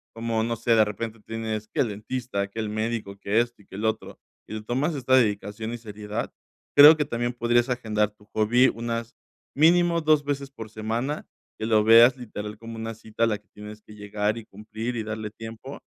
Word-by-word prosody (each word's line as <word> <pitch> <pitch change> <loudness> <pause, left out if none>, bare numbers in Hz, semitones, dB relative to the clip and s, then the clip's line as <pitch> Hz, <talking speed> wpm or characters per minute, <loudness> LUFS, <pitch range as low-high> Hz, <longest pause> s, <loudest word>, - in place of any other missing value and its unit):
como, 115 -1 -1
no 115 +1 -1
sé, 115 0 +2
de 110 -1 +5
repente 110 +2 -5
tienes, 110 -1 -4
que - - -6
el 125 - +2
dentista, 105 0 -3
que 100 +3 -8
el 110 -1 -2
médico, 110 -2 -3
que 100 +3 +1
esto 120 -3 -6
y - - -28
que 95 - -11
lo 110 +1 +2
otro 110 0 -6 0.3
y - - -8
le 110 - -4
tomas 130 +9 -1
esta 130 -2 +2
dedicación 110 -1 0
y 120 - -5
seriedad, 105 0 -5 0.5
creo 150 +3 +11
que 155 - 0
también 120 -3 -2
podrías 120 0 +2
agendar 110 -4 0
tu 105 0 -23
hobby 120 +4 +4
unas 115 0 -3 0.4
mínimo 170 +2 +4
2 155 -1 +3
veces 140 -1 -3
por 115 -5 -9
semana, 115 +7 -3 0.3
que 110 - -2
lo 110 -1 +3
veas 115 +3 +8
literal 105 -4 -7
como 115 0 -8
una 115 0 -5
cita, 110 0 -4
a - - +5
la 105 -2 -1
que 105 - -37
tienes 105 +1 -10
que 105 - -15
llegar 105 +1 -2
y 115 - -8
cumplir 110 +4 -6
y - - -1
darle 110 -1 -5
tiempo. 115 +5 -9
115 Hz, 210 wpm, -25 LUFS, 105-120 Hz, 0.5 s, creo